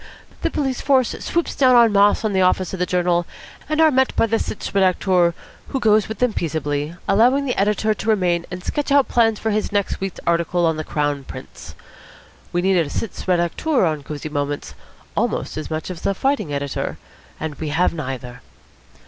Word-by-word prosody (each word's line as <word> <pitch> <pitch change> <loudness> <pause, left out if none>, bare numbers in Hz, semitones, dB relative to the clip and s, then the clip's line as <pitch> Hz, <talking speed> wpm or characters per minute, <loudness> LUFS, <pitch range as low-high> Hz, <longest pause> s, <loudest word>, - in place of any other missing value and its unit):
The - - +1
police 270 -4 -2
force 265 -3 +3
swoops 340 0 -1
down 255 -2 +5
en 235 -2 +6
masse 205 +2 +4
on 210 - 0
the 190 - +2
office 185 0 +2
of 190 - -4
the 180 - 0
journal, 175 -1 +1 0.4
and 310 0 0
are 320 -1 +6
met 265 -1 +2
by - - +3
the 225 0 0
sitz - - -4
redacteur, 185 -2 +2 0.3
who 270 - -2
goes 215 -3 +3
with 220 - -5
them 250 -3 +1
peaceably, 150 -2 -2
allowing 245 +8 +4
the 250 - 0
editor 210 +2 +1
to 215 +1 -4
remain 175 -5 +1
and 180 0 -7
sketch 290 +5 -2
out 280 -1 +5
plans 225 -2 +2
for 220 - -2
his 215 +1 -1
next 205 -1 -1
week's 195 -2 -4
article 170 +1 +1
on 160 -1 +1
the 155 - -3
Crown 145 -2 -1
Prince. - - -10 0.8
We 175 0 0
need 190 0 +3
a 165 -4 +1
sitz 220 - -5
redacteur 180 - +1
on 155 -2 -2
Cosy 150 +1 -6
Moments 145 -1 -3 0.4
almost - - -1
as 155 - -5
much 160 +3 -4
as 170 - -9
a 195 - +1
fighting 265 - 0
editor; 140 -1 -3 0.4
and 160 -1 -4
we 155 - -3
have 170 +5 +1
neither." 130 -5 -6
185 Hz, 195 wpm, -21 LUFS, 160-225 Hz, 0.8 s, en